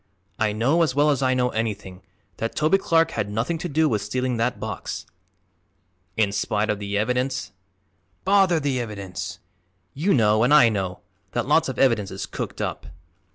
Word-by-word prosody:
I 110 -1 +2
know, 125 +11 +2
as 155 -6 +1
well 150 +1 +4
as 140 - 0
I 130 -1 +2
know 125 -1 +2
anything, 105 -5 -4 0.4
that 115 - -3
Toby 155 +6 +3
Clark 165 -3 +2
had 105 -2 -2
nothing 115 +11 -2
to 175 - -4
do 155 +2 +2
with 110 -7 0
stealing 125 0 -2
that 115 +2 -1
box." - - -5 1.1
"In 105 -2 +2
spite 105 +1 0
of 105 - -3
the 100 0 -2
evidence?" 125 +4 -1 0.7
"Bother 190 -4 +4
the 140 -3 -1
evidence! 100 -6 -5 0.6
You 180 +8 +1
know, 110 -2 +3
an' 130 +5 +4
I 145 -6 +7
know, 95 -4 -3 0.3
that - - -1
lots - - +3
of - - -5
evidence 115 -7 +2
is 95 0 -5
cooked - - -6
up." - - -4
120 Hz, 175 wpm, -24 LUFS, 105-145 Hz, 1.1 s, I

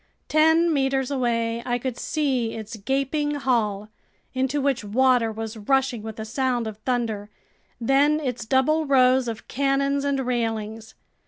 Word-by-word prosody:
Ten 320 +2 +4
meters 270 -1 0
away, 235 -3 0
I 245 0 -1
could 250 0 -4
see 260 -6 -1
its 220 0 -7
gaping 275 +6 -1
hull, 215 -7 0 0.4
into 265 +2 0
which 275 -4 0
water 245 +2 +2
was 220 +1 -6
rushing 255 +1 0
with 220 0 -8
a 220 - -4
sound 245 0 -1
of 215 -2 -6
thunder, 220 -3 -2 0.5
then 280 +5 +3
its 250 -6 -4
double 300 +5 +2
rows 255 -2 +4
of 230 -1 -6
cannons 275 +1 0
and 280 -1 0
railings. 225 -3 -3
255 Hz, 145 wpm, -24 LUFS, 225-275 Hz, 0.5 s, Ten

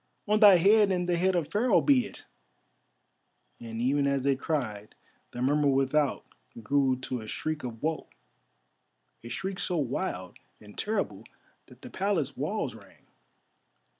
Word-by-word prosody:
On 210 +1 +2
thy 205 -3 +9
head 205 +3 +5
and 180 -1 -1
the 175 - +1
head 185 +2 +1
of 170 -4 -1
Pharaoh 230 +4 +3
be 260 -6 +3
it," - - -13 1.3
and 115 -1 -7
even 140 +4 +1
as 140 -1 0
they 140 0 +2
cried 120 -8 -4 0.3
the 120 - -5
murmur 145 +2 +2
without 135 +1 +1 0.4
grew 135 +2 +2
to 125 -2 -4
a 110 - -10
shriek 155 +6 -4
of 115 -1 -7
woe, 160 0 -2 1.2
a 120 - -8
shriek 190 +7 -4
so 180 0 -1
wild 125 - -3 0.2
and 105 -1 -15
terrible 210 -1 -2 0.4
that - - -18
the - - -9
Palace 175 -9 -1
walls 190 +11 -2
rang. - - -17
150 Hz, 150 wpm, -28 LUFS, 130-190 Hz, 1.3 s, thy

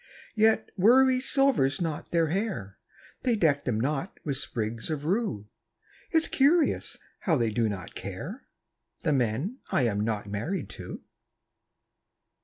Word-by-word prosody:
Yet 220 0 +3
worry 255 +6 +5
silvers 265 - +2
not 160 -4 -3
their 165 -2 +2
hair; 190 - -3 0.4
They 245 -3 +2
deck 150 -8 +2
them 115 -4 0
not 150 - -2
with 140 -3 0
sprigs 115 0 -3
of 150 -2 -3
rue. 180 - -1 0.6
It's 320 -1 +2
curious 295 +4 +2 0.2
how 165 -5 +2
they 115 -3 +1
do 115 0 +1
not 95 -4 -6
care - - -7 0.6
The 150 - +2
men 135 - 0
I 130 - +3
am 105 -4 +1
not 105 -1 -1
married 140 - -3
to. - - -8
155 Hz, 135 wpm, -28 LUFS, -, 0.6 s, worry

